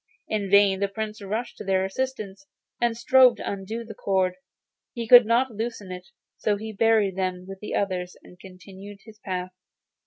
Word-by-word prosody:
In 205 -2 -2
vain 200 -1 +5
the 200 - +1
Prince 215 +2 -6
rushed 215 +5 -4
to - - -6
their 190 -1 +1
assistance 200 -3 -5 0.3
and 235 -1 +1
strove 255 -1 +5
to - - -7
undo 200 +4 -4
the 225 -1 -9
cord. 190 -3 0 0.6
He 235 -2 -4
could 245 -1 +9
not 240 +3 +2
loosen 220 -3 -5
it; 180 0 -8 0.3
so 210 -1 0
he 220 +1 -7
buried 215 -3 +2
them 185 -1 -2
like 195 0 -9
the 210 - -5
others 185 -2 -2
and 180 - -17
continued 195 +2 -12
his 215 -2 -15
path. 185 -2 -4
200 Hz, 180 wpm, -25 LUFS, 190-225 Hz, 0.6 s, could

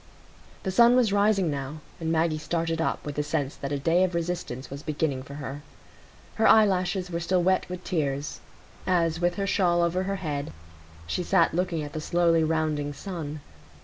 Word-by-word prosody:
The 190 - -1
sun 235 +5 +6
was 235 -5 +3
rising 200 -4 +3
now, 140 +2 -5 0.2
and 165 -1 -2
Maggie 160 -1 +1
started 165 0 -1
up - - -1
with 145 -1 -5
the - - +2
sense 145 -2 -2
that 140 - -5
a 145 - 0
day 165 +6 +3
of 185 -2 0
resistance 170 -7 -3
was 140 +1 -6
beginning 150 -3 -1
for 140 +1 -10
her. 140 0 -6 0.8
Her 220 - +4
eyelashes 185 -3 +3
were 170 - -1
still 180 +1 +1
wet 185 0 +2
with 180 0 -6
tears, 145 -5 -2 0.5
as, 165 -3 +2
with 175 0 +1
her 200 - -1
shawl 175 -3 +2
over 170 +2 +1
her 195 +1 -1
head, 150 -6 -4 0.5
she 80 - -2
sat 175 - +3
looking 175 -2 -1
at 145 - -7
the 155 - -4
slowly 170 0 +3
rounding 155 -2 0
sun. 155 -3 -6
165 Hz, 185 wpm, -26 LUFS, 150-180 Hz, 0.8 s, sun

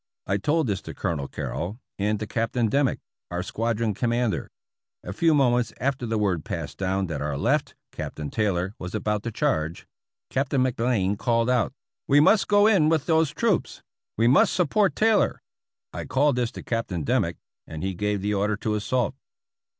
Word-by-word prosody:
I 95 - 0
told 155 +9 +1
this 100 -4 -1
to - - -9
Colonel 80 -8 -2
Carrol, 95 +8 -4 0.2
and 105 +1 0
to 110 - -3
Captain 115 +1 0
Dimmick, 140 +2 +1 0.3
our 90 +1 -3
squadron 115 +1 -1
commander. 120 +1 -1 0.5
A - - -6
few 165 -2 +3
mo 135 -4 +4
ments 120 -2 0
after 135 -2 -1
the 115 0 0
word 95 -6 0
passed - - -5
down 95 0 0
that 80 -5 -4
our 75 -1 -2
left - - 0 0.2
(Captain 75 -2 -6
Taylor) 95 -3 0
was 90 +3 -6
about 105 0 -1
to 115 - -4
charge. 100 - -1 0.5
Captain 135 0 +1
McBlain 115 -6 0
called 115 0 +2
out, 125 -1 +2 0.2
' - - -67
we 140 +1 +6
must 195 +7 +5
go 205 0 +5
in 190 -8 +5
with 160 -3 +1
those 160 -2 +3
troops; - - -1 0.3
we 115 +2 +3
must 130 - +5
support 190 +3 +2
Tay 225 +1 +4
lor.' 205 - +1 0.5
I - - -5
called 140 0 +2
this 120 -2 0
to - - -8
Captain 110 -8 -2
Dimmick, - - 0 0.3
and 80 0 -6
he 95 0 -1
gave 105 +1 -1
the 105 +1 0
order 105 +1 0
to 110 0 -2
assault." 110 +2 0
115 Hz, 185 wpm, -25 LUFS, 100-135 Hz, 0.5 s, we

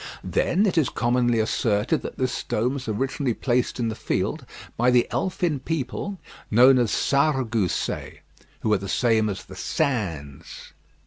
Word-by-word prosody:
Then 195 +4 +1
it 180 -5 +2
is 145 - +1
commonly 120 0 +1
asserted 110 -1 +1
that - - -7
this 130 -1 0
stone 120 +2 -1
was 135 -3 -6
originally 130 +3 -1
placed 125 -1 0
in 115 -2 0
the - - -3
field - - -2 0.3
by 120 +2 +3
the 125 -1 +4
elfin 175 -5 -1
people 165 +7 -4 0.3
known 125 +4 +6
as 120 -3 +2
Sarregousets, 130 - 0 0.4
who 110 - +1
are 100 - +2
the 100 0 -6
same 110 +1 +2
as 95 - -5
the 95 - -11
Sins. 95 - -3
120 Hz, 150 wpm, -24 LUFS, 110-135 Hz, 0.4 s, known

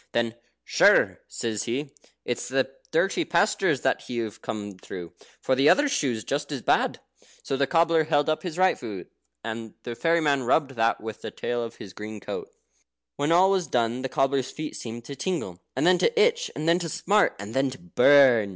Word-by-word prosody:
Then, 115 -1 0 0.3
"Sure," - - +4
says 110 -3 -3
he, 135 +4 -3 0.3
"it's - - -3
the - - 0 0.2
dirty - - +1
pastures - - +1
that - - -1
you've 115 -4 -4
come 105 -3 -6
through, 90 -3 -8 0.3
for 130 - 0
the 135 +3 +4
other 290 +1 +5
shoe's 130 - -1
as 140 -1 -3
bad." - - +1 0.4
So 135 - -2
the 140 0 +1
cobbler 165 -2 +3
held 145 -1 +1
up 155 0 0
his 175 -3 -6
right 185 0 +4
foot, 105 -7 -7 0.3
and 115 0 -6
the 120 - -5
fairy 165 +7 +2
man 145 -4 +2
rubbed 135 +3 +1
that 115 -2 0
with 110 0 -7
the - - -5
tail 120 0 -3
of 115 0 -7
his 95 - -11
green 105 0 -7
coat. - - -6 0.7
When 145 +3 0
all 185 +3 +5
was 190 -3 0
done 120 +1 0
the 135 - -3
cobbler's 135 -1 0
feet 155 -1 -6
seemed 115 0 -7
to 140 - -7
tingle, 130 - -3
and - - 0
then 180 0 +5
to 470 -1 +2
itch, 470 +2 +3
and 155 - -3
then 170 +1 +4
to 170 -2 -4
smart, 205 +6 +2
and 100 +2 -8
then 135 +1 +1
to 130 - -8
burn. 120 +3 +5
135 Hz, 195 wpm, -26 LUFS, 115-165 Hz, 0.7 s, other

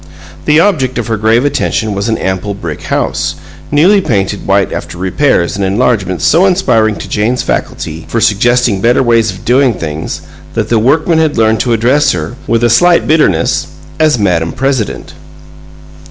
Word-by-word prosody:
The 150 +1 +4
object 150 -10 +1
of 120 - -2
her 115 - -1
grave 110 +4 +1
attention 110 -6 -1
was 100 +3 -2
an 110 - 0
ample 95 +2 -3
brick 85 -6 -6
house, - - -2 0.3
newly 180 +8 +4
painted 100 - -2
white 100 0 +1
after - - -6
repairs 95 0 0
and 100 - -2
enlargements 95 -4 0
so 175 +5 +4
inspiring 120 - +1
to - - -8
Jane's 115 +4 -1
faculty 80 0 -4
for 115 - -2
suggesting 115 0 +2
better 120 +4 +3
ways 115 -2 +2
of 95 -1 -8
doing 125 -1 +2
things, 80 -2 -5 0.3
that - - -2
the 115 - +2
workmen 155 +7 +2
had 160 -2 0
learned 110 -1 +2
to 120 0 0
address 125 +6 +2
her, 90 +6 -5
with 115 0 +1
a - - +5
slight 175 +8 +4
bitterness, 145 - +1 0.3
as 155 -3 +3
"Madam 85 -6 0
President." 130 -4 -2
115 Hz, 170 wpm, -11 LUFS, 100-135 Hz, 0.3 s, a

